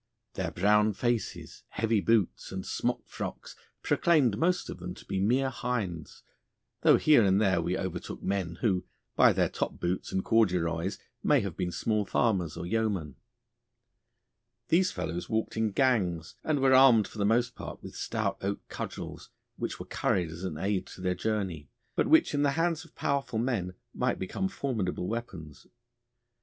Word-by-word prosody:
Their - - -2
brown 105 +3 +3
faces, 120 +2 -2
heavy 110 -1 0
boots, 110 -3 +1
and 95 -1 -4
smockfrocks - - -4 0.3
proclaimed 145 -11 +3
most 180 - +1
of - - -7
them 90 +1 -6
to - - -14
be 95 - -2
mere 130 +7 +2
hinds, 100 -13 -4 0.6
though - - +6
here 150 -7 +5
and 95 0 +4
there 95 -5 +3
we 90 +2 -1
overtook 95 -2 -5
men 95 -4 -1
who, 95 -5 +1 0.3
by - - +6
their - - +2
top - - -4
boots 90 +1 -2
and 95 - -1
corduroys, 90 -5 +1 0.2
may 145 -3 +4
have 100 -5 -4
been 90 -2 -2
small 105 +5 0
farmers 95 -6 0
or 85 - -4
yeomen. 100 - -1 1.5
These 180 +3 +3
fellows 85 0 -4
walked 110 0 -1
in 110 -1 +1
gangs, 95 - +1
and 150 -3 0
were 135 0 +5
armed 130 -6 +7
for 110 - -11
the - - +2
most 120 +4 +2
part - - -8
with - - -9
stout - - -2
oak 100 +1 -3
cudgels, - - -6 0.3
which - - -4
were - - -6
carried 85 -3 0
as 85 +3 -8
an 90 -5 -3
aid 95 +2 -1
to - - -11
their 90 0 +1
journey, 90 - -2 0.3
but - - +2
which 320 - +5
in 145 - +1
the 140 -1 +2
hands 165 0 0
of 165 - -19
powerful 135 -4 -1
men 110 -7 -1 0.2
might - - 0
become 95 - -2
formidable 110 - -2
weapons. 95 - -6
105 Hz, 165 wpm, -29 LUFS, 90-125 Hz, 1.5 s, armed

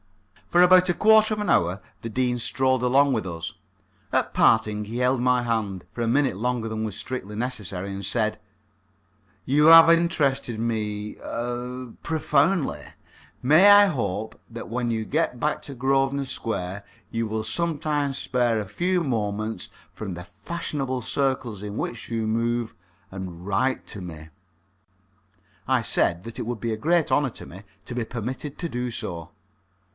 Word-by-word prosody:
For 175 +1 +5
about 185 0 +6
a 175 - +2
quarter 220 0 +5
of - - -7
an 210 - -2
hour 90 +3 +2 0.2
the 115 - -5
Dean 125 +2 0
strolled 130 +1 +1
along 135 +2 +4
with 110 -5 -1
us. 85 -2 -5 0.6
At - - 0
parting, 105 -1 +3
he 110 +3 -6
held 125 0 +2
my 125 0 +2
hand 110 -6 -2
for 120 - -5
a 115 - 0
minute 135 -2 +2
longer 120 +2 -1
than 110 0 -3
was 105 -4 -4
strictly 105 -5 -5
necessary 105 -6 -4
and 100 0 -6
said: 110 +2 0 1.1
"You 150 +4 +4
have 165 0 +10
interested 140 -8 +1
me 105 -2 -3
er 120 +1 -5
profoundly. 150 - +1 0.6
May 155 +10 +7
I 205 0 +9
hope 110 - -2
that 115 0 -8
when 120 +1 -1
you 110 -1 -2
get 150 -4 -1
back 150 +3 0
to 140 - -8
Grosvenor 135 +2 +1
Square, 100 -6 -4 0.3
you 115 0 -1
will 110 0 -2
sometimes 150 -1 -1
spare 120 -4 +1
a 105 - -3
few 175 - 0
moments 110 - -2 0.2
from 100 -5 -6
the 90 - -7
fashionable 130 - -4
circles 125 -5 -1
in 105 +1 -5
which 115 - -4
you 115 -2 -1
move, 115 +1 -1 0.4
and 90 -2 -7
write 115 +7 0
to 100 - -7
me?" 80 -3 -9 1.4
I - - +3
said 85 +1 +1
that 115 +1 -8
it - - -4
would 120 -2 -3
be 115 0 -2
a - - -3
great 160 +4 +1
honour 135 +1 +3
to - - -11
me 95 +3 -11 0.2
to 120 - -6
be 120 - -1
permitted 125 +5 -5
to 170 - -3
do 125 -4 -3
so. 105 -9 -5
120 Hz, 165 wpm, -25 LUFS, 105-140 Hz, 1.4 s, have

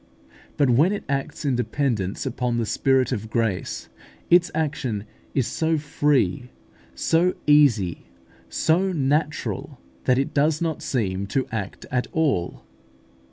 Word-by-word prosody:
But 140 -4 +3
when 155 - +4
it 205 - -4
acts 140 +3 -3
in 135 -3 +2
dependence 120 -4 -1
upon 125 -2 -1
the 115 - 0
Spirit 130 +3 +2
of 110 +1 -3
grace, 110 -4 -2 0.4
its 175 0 +6
action 135 -9 -1 0.3
is 135 -4 +2
so 160 +4 0
free, 145 -3 +1 0.5
so 165 - +2
easy, 120 - +3 0.4
so 170 - +2
natural, 150 0 -1 0.3
that 125 - +3
it 135 - -1
does 150 +1 +2
not 165 -3 -2
seem 100 -6 -1
to 130 +5 0
act 100 -4 -5
at 125 -1 0
all. 145 - 0
135 Hz, 130 wpm, -24 LUFS, 115-150 Hz, 0.5 s, its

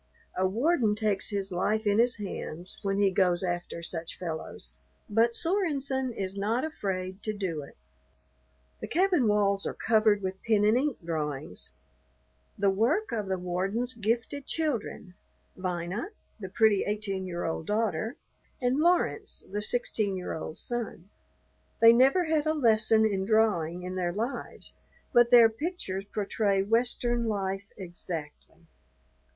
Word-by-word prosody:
A 185 +1 +2
warden 230 - +2
takes 210 -2 0
his 200 -2 -2
life 215 +5 0
in 205 +1 +3
his 240 +1 +4
hands 185 -4 -6
when 195 -2 -1
he 200 -1 +3
goes 180 -2 +2
after 175 -1 -3
such 165 -1 -4
fellows, 160 - -6 0.3
but 230 +2 +2
Sorenson 280 -8 0
is 195 -4 -4
not 215 +5 0
afraid 190 -9 -4
to 215 - -2
do 185 -7 -3
it. 140 - -13 1.0
The - - -5
cabin 355 - +2
walls 200 -1 +2
are - - -4
covered 215 -2 +3
with 190 0 -4
pen 215 -2 +2
and 215 +2 +4
ink 275 +1 0
drawings, 150 - -4 0.9
the 200 -1 +3
work 255 - +1
of 215 -4 -2
the 190 0 -1
warden's 190 +8 -1
gifted 230 +5 -2
children, 250 - -2 0.4
Vina, 185 - -3 0.3
the 190 -3 -6
pretty 215 0 +3
eighteen 200 -2 -3
year 175 -1 -4
old 160 -1 -3
daughter, 215 -1 -1 0.4
and 250 +2 +1
Laurence, 345 +3 +1
the 205 +1 -2
sixteen 210 -3 0
year 180 - -4
old 155 0 -6
son. 225 -6 -4 0.7
They 230 0 +8
never 270 +9 +5
had 315 -1 +1
a 310 - +2
lesson 220 -4 +4
in 195 -3 0
drawing 190 -6 +1
in 185 +1 -5
their 180 -2 -1
lives, 230 +7 -5 0.4
but 240 0 +6
their 240 -2 +8
pictures 225 - -4
portray 200 -1 0
Western 240 +2 +1
life 195 -1 -3
exactly. 170 -4 -7
210 Hz, 145 wpm, -28 LUFS, 185-235 Hz, 1.0 s, They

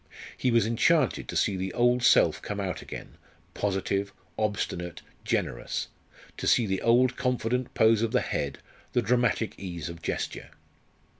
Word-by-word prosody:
He 130 - 0
was 115 -3 +4
enchanted 130 +5 +2
to - - -6
see 100 - +2
the 95 0 -3
old 120 +1 +3
self 120 - +4
come 105 0 -4
out 90 -5 -3
again - - -9 0.4
positive, 100 0 -1 0.2
obstinate, 95 -5 -2 0.2
generous; - - -2 0.5
to - - -3
see 120 - +4
the 95 -2 -1
old 125 +2 +4
confident 125 -1 -1
pose 110 0 +4
of 115 -1 0
the - - +2
head, 70 - -2 0.4
the 120 - +2
dramatic 120 -2 +1
ease 85 -4 -5
of 85 0 -9
gesture. - - -4
110 Hz, 150 wpm, -28 LUFS, 95-120 Hz, 0.5 s, was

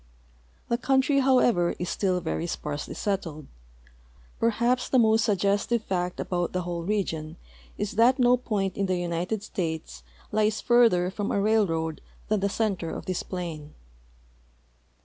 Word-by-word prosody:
The 235 - 0
country, 270 +2 +2
however, 245 -9 +3
is 180 - -3
still 185 -1 0
very 165 0 -2
sparsely 150 -3 -4
settled. 165 -7 -3 1.0
Perhai)s 235 +2 +1
the 260 - +3
most 220 -2 +4
suggestive 205 +3 +1
fact 180 -2 -2
about 175 -2 -2
the 180 0 -1
whole 170 -1 -3
region 165 -5 -2 0.4
is 205 0 -2
that 235 +5 +4
no 250 -1 +5
point 205 -6 -2
in 195 - 0
the 185 -1 0
United 175 +4 -2
States 160 -6 -4 0.3
lies 215 0 +1
further 225 -7 +4
from 205 +1 -3
a - - +1
railroad 180 -7 +1 0.3
than 215 -1 +2
the 200 +1 0
center 200 -6 -1
of - - -6
this 185 -2 -2
plain. 165 -5 -6
195 Hz, 145 wpm, -26 LUFS, 175-225 Hz, 1.0 s, no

